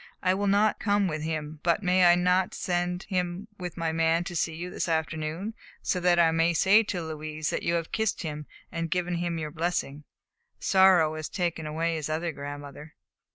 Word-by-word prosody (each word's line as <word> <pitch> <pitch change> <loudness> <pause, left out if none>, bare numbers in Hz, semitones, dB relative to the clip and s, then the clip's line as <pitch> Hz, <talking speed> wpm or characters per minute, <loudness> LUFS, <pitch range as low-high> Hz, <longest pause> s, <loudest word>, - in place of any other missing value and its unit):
I 185 0 +3
will 200 +2 -1
not 205 +2 +3
come 205 -2 +2
with 155 -3 -3
him, 155 -1 -4
but 170 +4 +1
may 180 0 +4
I 175 0 +7
not 180 +1 +2
send 180 0 -1
him 180 +1 -2
with 180 -2 -6
my 165 -1 -1
man 165 +1 +2
to 175 - -6
see 160 0 -1
you 175 +2 -6
this - - -2
afternoon, 160 +5 -2 0.3
so 180 - 0
that 175 -1 +3
I 165 -1 +5
may 165 +1 +2
say 200 +6 +6
to 185 -5 -3
Louise 155 0 -4
that - - -2
you 170 - 0
have 165 -1 -2
kissed 220 -3 -1
him 150 -2 -5 0.2
and 165 0 -3
given 180 0 -1
him 170 -1 -2
your 155 -1 -4
blessing? 160 -3 -2 0.6
Sorrow 190 -5 +5
has 155 - -5
taken 170 -4 -2
away 165 +2 -1
his 155 -1 -4
other 165 +2 -1
grandmother." 145 +1 -8
170 Hz, 200 wpm, -27 LUFS, 155-180 Hz, 0.6 s, I